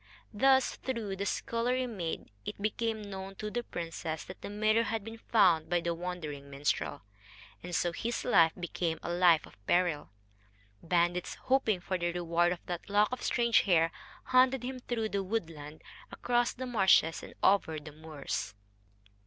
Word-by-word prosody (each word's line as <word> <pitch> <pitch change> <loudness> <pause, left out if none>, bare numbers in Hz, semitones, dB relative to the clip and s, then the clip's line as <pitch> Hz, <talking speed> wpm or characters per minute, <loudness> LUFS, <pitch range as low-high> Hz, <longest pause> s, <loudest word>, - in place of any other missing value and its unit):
Thus, 265 +4 +3
through 260 - -3
the 230 - -3
little 195 +1 -3
scullery 250 +2 0
maid, 185 - -5
it - - -6
became 220 +1 -1
known 195 -1 -7
to 210 +2 -5
the 240 - -1
princess 165 -6 -5
that 185 - -11
the - - -6
mirror 215 +2 +2
had 225 -2 -2
been 225 +1 -9
found 180 -10 +3
by 175 0 +2
the 170 0 -1
wandering 165 -5 -6
minstrel, 140 - -2 0.6
and 175 0 -5
so 175 - +1
his 230 +7 -3
life 165 -9 +5
became 170 -1 -2
a 170 - -3
life 175 -3 +5
of 100 - -19
peril. 175 -4 +1 0.7
Bandits, 175 +1 0
hoping 230 -8 +1
for 185 0 -2
the 175 0 0
reward 175 0 +1
of 180 - -5
that 175 +1 -5
lock 205 +2 +3
of 255 - -4
strange 235 -1 +3
hair, 165 -4 +3 0.3
hunted 255 0 +3
him 255 +1 -4
through 230 -3 -2
the 200 -1 -1
woodland, 165 -7 -5 0.3
across 240 0 +1
the 255 - -6
marshes, 190 -8 +4
and - - -11
over 185 -5 +3
the 150 0 -10
moors. 150 -9 -5
185 Hz, 170 wpm, -31 LUFS, 165-225 Hz, 0.7 s, life